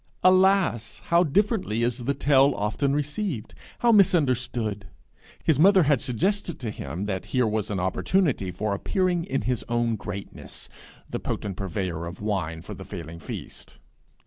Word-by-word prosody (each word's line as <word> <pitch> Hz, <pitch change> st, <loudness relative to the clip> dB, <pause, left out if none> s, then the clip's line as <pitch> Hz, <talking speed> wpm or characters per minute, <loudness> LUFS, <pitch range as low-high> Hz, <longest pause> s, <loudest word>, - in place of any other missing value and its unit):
Alas, 185 Hz, -, +3 dB
how 170 Hz, +1 st, +5 dB
differently 180 Hz, -, +1 dB
is 120 Hz, 0 st, -1 dB
the 140 Hz, +2 st, 0 dB
tale 140 Hz, 0 st, +4 dB
often 105 Hz, +7 st, 0 dB
received! 150 Hz, -, -2 dB, 0.3 s
how 235 Hz, -, +7 dB
misunderstood! 130 Hz, -, +2 dB, 0.6 s
His 150 Hz, -4 st, +2 dB
mother 190 Hz, +2 st, +6 dB
had 145 Hz, -4 st, +3 dB
suggested 175 Hz, -, -1 dB
to 115 Hz, -4 st, -3 dB
him 85 Hz, +3 st, -5 dB
that 95 Hz, -2 st, -3 dB
here 125 Hz, -, +4 dB
was 110 Hz, -1 st, -1 dB
an 100 Hz, -2 st, -1 dB
opportunity 120 Hz, -, +1 dB
for 100 Hz, +3 st, -2 dB
appearing 180 Hz, -, 0 dB
in 200 Hz, -, -1 dB
his 120 Hz, +2 st, -1 dB
own 120 Hz, -1 st, +1 dB
greatness, 100 Hz, 0 st, -7 dB, 0.4 s
the -, -, -4 dB
potent 100 Hz, -3 st, -3 dB
purveyor 95 Hz, -4 st, -3 dB
of 85 Hz, +2 st, -8 dB
wine 85 Hz, -6 st, -2 dB
for -, -, -7 dB
the -, -, -9 dB
failing 80 Hz, +2 st, -8 dB
feast. -, -, -8 dB
120 Hz, 150 wpm, -26 LUFS, 100-170 Hz, 0.6 s, how